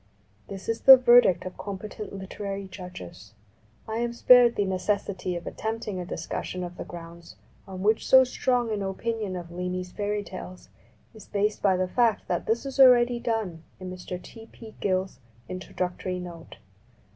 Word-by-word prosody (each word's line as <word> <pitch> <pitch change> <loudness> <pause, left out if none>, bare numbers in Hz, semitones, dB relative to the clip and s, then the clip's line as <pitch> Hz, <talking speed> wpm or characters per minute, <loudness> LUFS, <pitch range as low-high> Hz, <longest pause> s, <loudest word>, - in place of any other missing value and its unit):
This 195 -1 -8
is 225 0 -2
the 265 -1 +11
verdict 245 -8 +5
of 185 - -8
competent 205 +1 -7
literary 195 0 -6
judges. 180 - -10 0.5
I 220 0 -3
am 235 0 -1
spared 240 0 +6
the 205 - +1
necessity 190 -1 -2
of 175 - -6
attempting 220 -3 -4
a 180 - -4
dis 165 - -5
cussion 180 0 -4
of 175 0 -9
the - - -5
grounds 170 0 -11 0.3
on 190 -1 -7
which 215 +2 +2
so 260 0 +8
strong 250 -2 0
an 210 -2 -2
opinion 200 +1 -3
of 175 -1 -7
Leamy's 180 +1 -4
fairy 205 +1 -2
tales 185 -1 -10 0.4
is 220 -3 -14
based 210 +1 -1
by 190 -2 +3
the 185 0 0
fact 230 +1 +1
that 175 - -2
this 230 +4 0
is 275 0 -6
already 245 -2 +6
done 220 -9 -2 0.2
in 185 -1 -7
Mr. 180 0 -6
T. 225 +4 -13
P. 220 -2 -12
Gill's 190 -1 -1 0.3
In 185 0 -5
troductory 180 0 -4
Note. 170 -2 -10
195 Hz, 170 wpm, -26 LUFS, 180-225 Hz, 0.5 s, the